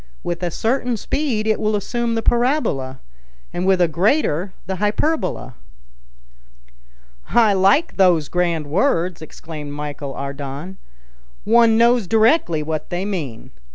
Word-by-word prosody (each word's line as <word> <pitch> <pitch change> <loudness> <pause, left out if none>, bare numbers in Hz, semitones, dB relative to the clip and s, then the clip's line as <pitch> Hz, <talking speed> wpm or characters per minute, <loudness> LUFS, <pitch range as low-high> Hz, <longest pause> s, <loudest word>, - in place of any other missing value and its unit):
"With 175 0 -3
a 175 - -1
certain 240 - -1
speed 245 -2 -2
it 220 -1 +1
will 215 0 0
assume 230 +3 -2
the 225 - -2
parabola, 235 - 0 0.5
and 180 +2 -2
with 190 -1 +3
a 175 - +4
greater 185 - +1
the 190 +1 -4
hyperbola." 210 - -1 1.8
"I 220 -1 +4
like 195 - +2
those 175 -6 +4
grand 170 -3 -1
words," 175 - 0
exclaimed 155 -2 -8
Michel 145 -1 -6
Ardan; 140 +6 -6 0.7
"one 230 0 +4
knows 235 -3 +3
directly 220 - +3
what 155 0 -4
they 175 +2 -3
mean. 155 - -5
190 Hz, 125 wpm, -20 LUFS, 155-225 Hz, 1.8 s, a